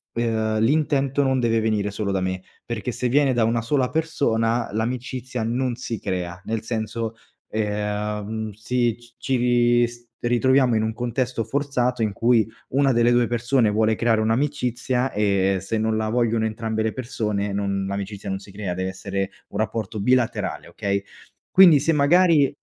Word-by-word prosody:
ehm, 110 Hz, -2 st, 0 dB
l'intento 140 Hz, +1 st, +2 dB
non 130 Hz, -2 st, +2 dB
deve 115 Hz, -1 st, +2 dB
venire 105 Hz, -2 st, 0 dB
solo 100 Hz, 0 st, -2 dB
da 95 Hz, -1 st, 0 dB
me, 95 Hz, 0 st, -2 dB, 0.2 s
perché 120 Hz, +1 st, -3 dB
se 125 Hz, -, -2 dB
viene 135 Hz, +1 st, +3 dB
da 120 Hz, -2 st, +2 dB
una 115 Hz, +1 st, +1 dB
sola 125 Hz, +2 st, 0 dB
persona 120 Hz, -8 st, 0 dB
l'amicizia 125 Hz, +2 st, -3 dB
non 120 Hz, +2 st, -1 dB
si 120 Hz, -3 st, -5 dB
crea, 90 Hz, -1 st, -4 dB
nel 110 Hz, -1 st, -2 dB
senso, 115 Hz, 0 st, -3 dB, 0.4 s
ehm, 105 Hz, 0 st, -2 dB
sì, 115 Hz, +2 st, 0 dB
c 120 Hz, -1 st, -20 dB
ci 135 Hz, -, -1 dB
ri 120 Hz, 0 st, +3 dB
s 120 Hz, 0 st, -14 dB
ritroviamo 125 Hz, +1 st, +3 dB
in 110 Hz, -, +1 dB
un 110 Hz, 0 st, -1 dB
contesto 120 Hz, 0 st, -2 dB
forzato 125 Hz, -3 st, -1 dB
in 105 Hz, -2 st, -1 dB
cui 115 Hz, +1 st, +3 dB, 0.2 s
1 135 Hz, 0 st, +2 dB
delle 120 Hz, 0 st, +3 dB
2 120 Hz, -1 st, +3 dB
persone 120 Hz, 0 st, +2 dB
vuole 110 Hz, +1 st, +2 dB
creare 115 Hz, -1 st, +2 dB
un'amicizia 125 Hz, +1 st, 0 dB
e 100 Hz, -2 st, +1 dB
se 105 Hz, +4 st, -2 dB
non 110 Hz, 0 st, 0 dB
la 110 Hz, 0 st, -1 dB
vogliono 115 Hz, -1 st, +1 dB
entrambe 110 Hz, 0 st, -2 dB
le 110 Hz, -, -1 dB
persone 105 Hz, -5 st, -2 dB
non 100 Hz, -1 st, -1 dB
l'amicizia 100 Hz, 0 st, -5 dB
non 95 Hz, 0 st, -2 dB
si 100 Hz, 0 st, -14 dB
crea, 100 Hz, -3 st, -3 dB
dev'essere 95 Hz, +1 st, -3 dB, 0.2 s
un -, -, -6 dB
rapporto 110 Hz, 0 st, -2 dB
bilaterale, 125 Hz, +2 st, 0 dB
okay, 100 Hz, 0 st, -2 dB, 0.5 s
quindi 175 Hz, -6 st, +8 dB
se 165 Hz, -, +2 dB
magari 155 Hz, 0 st, +4 dB
115 Hz, 165 wpm, -23 LUFS, 105-125 Hz, 0.5 s, quindi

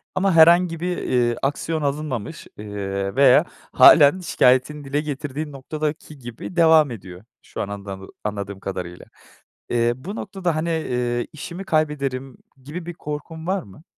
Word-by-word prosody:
ama 190 Hz, 0 st, +2 dB
herhangi 170 Hz, +1 st, +6 dB
bir, 180 Hz, +1 st, -2 dB
eee, 120 Hz, -1 st, +1 dB
aksiyon 155 Hz, +3 st, -1 dB
alınmamış, 145 Hz, -2 st, -4 dB
eee, 100 Hz, -1 st, -4 dB
veya 135 Hz, -2 st, +6 dB, 0.3 s
hâlen 145 Hz, +6 st, +7 dB
şikâyetini 145 Hz, -3 st, +2 dB
dile 140 Hz, +2 st, -1 dB
getirdiğin 150 Hz, 0 st, -5 dB
noktadaki 150 Hz, +2 st, -5 dB
gibi 120 Hz, +8 st, -8 dB
devam 160 Hz, -4 st, +5 dB
ediyor. 95 Hz, -4 st, -10 dB, 0.2 s
Şu -, -, -7 dB
an -, -, -3 dB
andamı 100 Hz, -1 st, -7 dB, 0.2 s
anladığım 100 Hz, -1 st, -4 dB
kadarıyla, 90 Hz, -3 st, -6 dB, 0.6 s
eee, 120 Hz, 0 st, +2 dB
bu 170 Hz, -, -8 dB
noktada, 190 Hz, -6 st, -3 dB
hani, 160 Hz, +2 st, -1 dB
eee, 125 Hz, -7 st, -1 dB
işimi 170 Hz, +5 st, -7 dB
kaybederim 140 Hz, -6 st, -1 dB, 0.3 s
gibi 160 Hz, +5 st, -7 dB
bir 175 Hz, -, -6 dB
korkun 160 Hz, +2 st, -7 dB
var 190 Hz, +1 st, 0 dB
mı? 105 Hz, +8 st, -16 dB
145 Hz, 140 wpm, -22 LUFS, 120-160 Hz, 0.6 s, hâlen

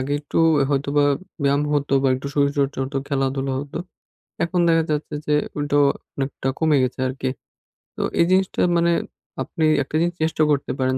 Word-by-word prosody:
আগে 135 Hz, +2 st, -2 dB
একটু 145 Hz, -, -3 dB, 0.3 s
হয়তো 140 Hz, 0 st, 0 dB
বা, 145 Hz, -, +5 dB, 0.4 s
ব্যায়াম 140 Hz, +1 st, +2 dB
হতো 145 Hz, -1 st, 0 dB
বা, 135 Hz, -, +3 dB
একটু 130 Hz, +2 st, -5 dB
শরীরচর্চা 140 Hz, -1 st, +1 dB
হতো 135 Hz, +1 st, -5 dB
খেলা-ধুলা 135 Hz, -1 st, -1 dB
হত, 140 Hz, 0 st, -7 dB, 0.7 s
এখন 175 Hz, +1 st, 0 dB
দেখা 165 Hz, -1 st, +3 dB
যাচ্ছে 150 Hz, 0 st, -2 dB
যে 150 Hz, -, +2 dB, 0.2 s
উলটো 145 Hz, 0 st, 0 dB, 0.4 s
অনেকটা 135 Hz, -1 st, -3 dB
কমে 160 Hz, -2 st, +3 dB
গেছে 130 Hz, 0 st, -2 dB
আরকি, 130 Hz, 0 st, -3 dB, 0.7 s
তো -, -, -2 dB, 0.2 s
এই 170 Hz, -, +6 dB
জিনিসটা 190 Hz, 0 st, +2 dB, 0.2 s
মানে 170 Hz, 0 st, +3 dB, 0.5 s
আপনি 160 Hz, -3 st, -2 dB, 0.2 s
একটা 145 Hz, -, -7 dB
জিনিস 175 Hz, 0 st, 0 dB
চেষ্টা 160 Hz, -1 st, +1 dB
করতে 140 Hz, -1 st, 0 dB
পারেন 130 Hz, 0 st, +1 dB
145 Hz, 170 wpm, -22 LUFS, 135-155 Hz, 0.7 s, এই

